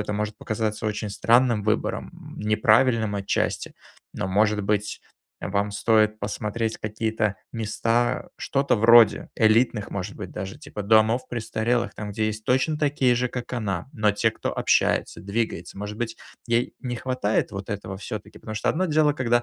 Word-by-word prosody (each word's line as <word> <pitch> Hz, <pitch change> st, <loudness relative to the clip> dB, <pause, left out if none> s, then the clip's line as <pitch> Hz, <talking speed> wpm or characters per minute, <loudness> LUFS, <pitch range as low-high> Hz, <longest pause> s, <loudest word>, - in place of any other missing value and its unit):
это 105 Hz, 0 st, -3 dB
может 105 Hz, 0 st, -3 dB
показаться 110 Hz, -1 st, -2 dB
очень 105 Hz, 0 st, -3 dB
странным 120 Hz, 0 st, +3 dB
выбором, 110 Hz, +1 st, -2 dB
неправильным 110 Hz, +1 st, +3 dB
отчасти, 100 Hz, -1 st, -1 dB, 0.4 s
но, -, -, -2 dB
может 105 Hz, +2 st, +2 dB
быть, 105 Hz, +1 st, -1 dB, 0.4 s
вам 100 Hz, +1 st, -1 dB
стоит 110 Hz, 0 st, +2 dB
посмотреть 110 Hz, +2 st, -2 dB
какие-то 110 Hz, -1 st, -1 dB, 0.2 s
места, 115 Hz, +1 st, 0 dB
что-то 140 Hz, -2 st, +1 dB
вроде 115 Hz, +1 st, +6 dB
элитных, 110 Hz, -1 st, +3 dB
может 100 Hz, +1 st, -5 dB
быть, 95 Hz, -4 st, -7 dB
даже, 95 Hz, +7 st, -6 dB
типа 140 Hz, -8 st, -7 dB
домов 110 Hz, +4 st, +3 dB
престарелых, 120 Hz, +1 st, -1 dB
там, 105 Hz, -1 st, -6 dB
где 110 Hz, +1 st, 0 dB
есть 110 Hz, 0 st, -4 dB
точно 130 Hz, +5 st, +1 dB
такие 140 Hz, -4 st, +2 dB
же 125 Hz, +1 st, 0 dB
как 120 Hz, 0 st, -6 dB
она, 100 Hz, -6 st, -2 dB
но 105 Hz, -1 st, +2 dB
те 110 Hz, +2 st, +2 dB
кто -, -, -4 dB
общается, -, -, +1 dB
двигается, 100 Hz, -3 st, -3 dB
может 105 Hz, +1 st, -6 dB
быть, 115 Hz, -1 st, -3 dB, 0.3 s
ей 120 Hz, +1 st, +1 dB
не 120 Hz, -2 st, -4 dB
хватает 125 Hz, -4 st, -1 dB
вот 100 Hz, +1 st, -7 dB
этого 100 Hz, -2 st, -5 dB
всё-таки? -, -, -7 dB
Потому 110 Hz, -, -7 dB
что 105 Hz, -, +1 dB
одно 185 Hz, +4 st, 0 dB
дело, 155 Hz, -2 st, +3 dB
когда 120 Hz, -3 st, +1 dB
110 Hz, 160 wpm, -25 LUFS, 105-120 Hz, 0.4 s, вроде